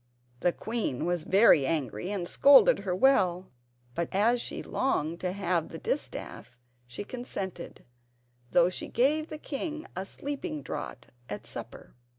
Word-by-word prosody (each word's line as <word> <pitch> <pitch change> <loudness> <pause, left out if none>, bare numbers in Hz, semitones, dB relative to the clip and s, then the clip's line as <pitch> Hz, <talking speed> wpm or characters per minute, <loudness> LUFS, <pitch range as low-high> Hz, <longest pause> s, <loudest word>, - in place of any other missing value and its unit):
The 175 - +2
queen 215 - -2
was 175 -2 -1
very 190 -7 +6
angry, 135 - -2
and 195 -4 -3
scolded 270 -3 +6
her 190 -3 -2
well; 185 -6 +3 0.4
but 170 +3 -2
as 230 +5 +3
she - - -5
longed 170 - -1
to 180 - -2
have 180 -4 -1
the - - -7
distaff 125 - -4 0.3
she 120 +10 -6
consented, 205 -6 -6 0.6
though 175 +4 +4
she 185 - -4
gave 300 +6 +1
the 310 - -7
king 310 +1 -4
a 190 +1 -4
sleeping 290 - -5
draught 120 - -6 0.2
at 105 - -6
supper. - - -8
190 Hz, 145 wpm, -29 LUFS, 170-260 Hz, 0.6 s, very